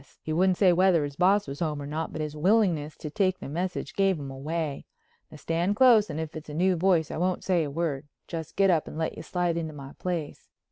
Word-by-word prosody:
He 155 - -3
wouldn't 185 +2 +3
say 185 -3 +5
whether 180 -3 +4
his 145 -1 -5
boss 190 +4 +3
was 140 +1 -6
home 155 -3 -1
or 140 - -6
not, 155 +3 -3
but 155 - -5
his 150 0 -4
willingness 170 -4 +2
to 150 - -7
take 185 0 +1
the - - -8
message 175 +6 -3
gave 195 -2 +2
him 140 -2 -6
away. 150 +2 -4 0.4
Now - - -12
stand 170 +5 -1
close 225 -3 +6
and 155 - -4
if 160 -1 -5
it's 155 -1 -8
a 150 - -6
new 185 +3 +2
voice 170 -2 +2
I - - -4
won't 180 +2 0
say 180 -3 +2
a 145 - -3
word, 145 -2 -2 0.2
just 160 -2 -6
get 195 -1 +4
up 160 -3 +1
and - - -8
let 160 0 -2
you - - -7
slide 175 -2 -1
into 160 -2 -3
my 140 -1 -9
place." 170 -5 -4
165 Hz, 245 wpm, -27 LUFS, 150-185 Hz, 0.4 s, close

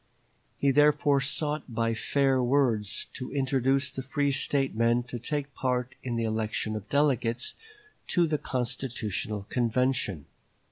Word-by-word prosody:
He, 140 - +3
therefore, 145 0 +4
sought 145 0 -2
by 115 0 +1
fair 135 +3 +2
words 120 -5 +1
to 125 - -6
induce 135 0 +1
the 130 - -5
free 140 +2 0
State 135 0 +1
men 115 +2 +2
to 120 0 -7
take 145 +3 -3
part 125 -1 -1
in 120 -2 -3
the 115 - 0
election 110 0 -1
of 105 -1 -7
delegates 130 -5 +1 0.5
to 175 -2 +3
the 155 -2 0
constitutional 115 -5 -3
convention. 120 - 0
130 Hz, 135 wpm, -28 LUFS, 115-140 Hz, 0.5 s, therefore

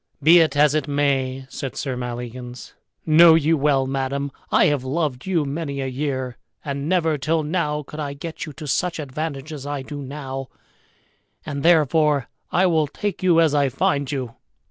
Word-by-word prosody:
"Be 165 +4 +8
it 155 -3 +2
as 150 0 +5
it 155 -2 0
may," 135 -2 0
said 135 -1 -6
Sir 135 -3 -3
Maleagans, 125 0 -7 0.3
"know 160 +1 +7
you 160 +1 +3
well, 140 -2 +2
madam, 135 +1 -2 0.2
I - - +5
have 145 -3 +1
loved 140 0 -2
you 170 -6 +1
many 140 0 -4
a 135 - -2
year 130 -2 -3 0.3
and 140 +1 -3
never 165 -5 +1
till 155 +3 0
now 150 -2 -1
could 150 +2 -10
I 145 -2 -3
get 160 +3 -7
you 150 - -8
to 155 +1 -9
such 175 +4 0
advantage 150 0 -5
as 145 -2 -7
I 145 -2 -3
do 145 +1 -7
now; 135 -1 -6 1.0
and 140 -1 -4
therefore 150 -4 +3 0.2
I 185 - +3
will 160 -4 +2
take 205 +5 -4
you 175 -3 +4
as 160 -3 +4
I 140 -2 +3
find 140 +2 0
you." 130 -5 -4
145 Hz, 180 wpm, -22 LUFS, 135-160 Hz, 1.0 s, Be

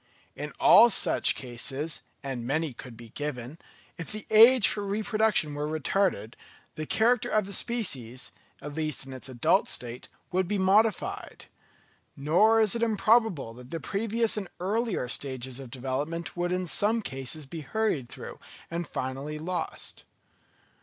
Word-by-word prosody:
In - - -6
all 240 - +8
such - - +5
cases—and 135 0 -3
many 145 +3 -1
could 120 -1 -10
be 115 -1 -12
given—if 145 +4 -8
the 215 0 -4
age 225 -1 +7
for 205 - -2
reproduction 210 -5 +1
were 145 +1 -3
retarded, 155 - -1 0.4
the 155 0 -6
character 235 +1 +2
of 215 -2 +1
the 200 - -5
species, 130 - 0 0.3
at 150 0 -6
least 155 -3 -2
in 135 - -9
its 130 +1 -7
adult 120 -2 +2
state, 120 0 -3 0.2
would 185 0 0
be 205 +2 -1
modified; 200 +2 +1 0.7
nor 180 +11 +4
is 215 -3 +4
it 235 - -3
improbable 215 - +2
that 125 +1 -13
the 165 - -4
previous 225 +4 0
and 195 -4 -4
earlier 205 - -1
stages 130 0 -3
of 135 -3 -9
development 135 +7 -4
would 175 0 -2
in 180 0 -1
some 215 +6 +1
cases 135 +1 -3
be 160 +4 -7
hurried 155 - -2
through - - -9 0.3
and 170 -1 -3
finally 135 +4 -5
lost. 170 +1 -5
160 Hz, 145 wpm, -27 LUFS, 135-210 Hz, 0.7 s, all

